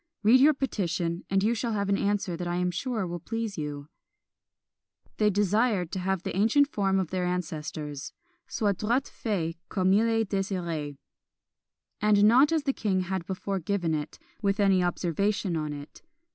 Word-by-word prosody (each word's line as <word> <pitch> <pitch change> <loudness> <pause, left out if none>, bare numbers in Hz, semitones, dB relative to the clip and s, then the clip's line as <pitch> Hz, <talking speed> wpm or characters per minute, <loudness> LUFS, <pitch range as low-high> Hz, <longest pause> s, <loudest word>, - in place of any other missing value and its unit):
Read 230 +5 +6
your 295 +3 +6
petition, 175 -9 -2
and 195 0 +2
you 225 +3 +3
shall 235 0 -2
have 200 -1 -1
an 200 - +2
answer 200 -3 0
that 175 +1 -4
I 175 - -1
am 180 0 0
sure 220 +2 -2
will 175 0 -4
please 225 +2 -4
you." 145 -2 -5 1.3
They 210 -1 +3
desired 205 -2 +1
to 190 - -3
have 190 0 -1
the - - -4
ancient 230 +9 +4
form 195 -7 0
of 185 -4 -1
their 185 -1 -1
ancestors, 155 -4 -4 0.4
"Soit 205 -5 -1
droit 240 +6 +1
fait 170 -7 -3
come 190 -1 +2
il 220 +3 +4
est 225 -1 +1
desyré," 170 -7 -2 1.0
and 210 -1 +4
not 250 +8 +6
as 320 -3 +1
the 275 - 0
king 190 -6 0
had 185 -1 -3
before 195 +1 -3
given 175 -2 -1
it, 150 0 -4 0.2
with 200 0 0
any 195 -2 +4
observation 180 +2 0
on 155 -2 -2
it. 145 0 -9
195 Hz, 175 wpm, -27 LUFS, 175-215 Hz, 1.3 s, Read